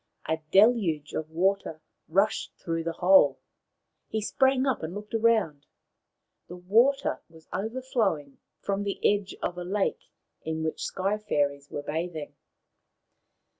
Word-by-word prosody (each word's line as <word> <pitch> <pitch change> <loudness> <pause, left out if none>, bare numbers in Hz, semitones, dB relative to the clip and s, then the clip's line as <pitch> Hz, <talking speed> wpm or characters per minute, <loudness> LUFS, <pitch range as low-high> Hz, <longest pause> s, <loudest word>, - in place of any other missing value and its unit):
A 160 0 0
deluge 190 -9 +4
of 155 0 -3
water 180 -1 0 0.3
rushed 195 +6 +1
through 165 -1 -3
the 165 - -2
hole. 175 -5 +5 0.7
He 220 - -2
sprang 265 +4 +2
up 265 -4 0
and 160 +4 -5
looked 210 +1 -8
round. 220 -11 +2 0.8
The 175 - -8
water 225 +10 +2
was 160 -1 -18
overflowing 215 - -2 0.2
from 200 0 -1
the 200 -1 -3
edge 205 -1 0
of 175 - -2
a - - -4
lake 195 +2 -2 0.3
in 160 0 -3
which 160 - -3
Sky 195 +2 -1
fairies 140 -7 -1
were 145 - -5
bathing. 160 -1 -4
185 Hz, 130 wpm, -27 LUFS, 160-210 Hz, 0.8 s, hole